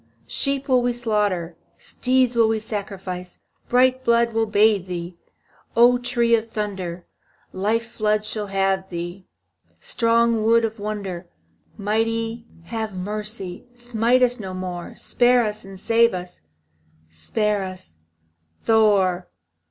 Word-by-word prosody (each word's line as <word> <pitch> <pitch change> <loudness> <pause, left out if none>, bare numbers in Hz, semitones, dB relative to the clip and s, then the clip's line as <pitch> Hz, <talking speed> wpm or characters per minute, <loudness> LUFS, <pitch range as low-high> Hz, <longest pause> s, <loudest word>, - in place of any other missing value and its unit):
Sheep 275 -1 0
will 255 -2 +4
we 245 0 +1
slaughter, 205 -8 -1 0.2
Steeds 255 -1 +1
will 230 -1 +5
we 220 0 +1
sacrifice; 195 -4 -6 0.3
Bright 255 +1 +3
blood 235 -1 +3
shall 225 0 0
bathe 210 -2 +3
thee, 175 -1 -5 0.6
O 245 +1 +6
tree 240 -1 +1
of 230 0 +2
Thunder, 190 -5 -4 0.5
Life 215 +5 0
floods 215 -2 0
shall 215 -2 -2
lave 195 -1 0
thee, 175 +2 -6 0.5
Strong 230 -1 +2
wood 230 +1 +4
of 220 0 -5
wonder. 195 -4 -5 0.5
Mighty, 225 +2 -1 0.2
have 220 0 -4
mercy, 210 0 -3
Smite 240 +1 +1
us 245 -1 +2
no 190 -3 -6
more, 180 -2 -6
Spare 245 0 +3
us 210 -1 -3
and 195 -1 -11
save 230 0 +3
us, 180 0 -8 0.7
Spare 200 - -1
us, 185 - -8 0.7
Thor! 200 -5 +3
215 Hz, 125 wpm, -22 LUFS, 190-235 Hz, 0.7 s, O